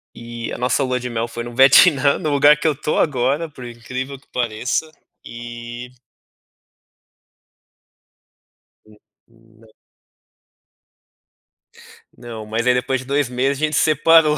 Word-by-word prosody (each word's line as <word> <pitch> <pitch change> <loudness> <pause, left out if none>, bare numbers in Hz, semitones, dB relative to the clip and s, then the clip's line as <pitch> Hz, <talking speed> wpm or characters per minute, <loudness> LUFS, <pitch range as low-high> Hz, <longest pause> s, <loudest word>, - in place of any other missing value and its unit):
E 115 0 -7
a - - -5
nossa 125 +3 0
lua 130 -1 -1
de 125 0 -5
mel 115 0 -2
foi 120 0 -6
no 120 0 -9
Vietnã, 140 +2 +5
no 155 - -2
lugar 145 +1 +5
que 155 - -1
eu 155 - +1
tô 150 +2 -2
agora. 140 +3 0
Por 130 -4 -11
incrível 130 +3 -7
que 140 - -30
pareça. 125 +6 -2 0.3
E 120 +1 -9 2.9
Hum, 105 -1 -20 0.3
não. 115 -1 -24 2.5
Não. 115 -3 -9
Mas 115 +3 -2
aí 125 - +5
depois 125 +1 -1
de - - -12
2 140 -1 0
meses 130 +3 -1
a - - +3
gente 155 0 -3
separou. 155 0 +4
125 Hz, 135 wpm, -20 LUFS, 120-140 Hz, 2.9 s, Vietnã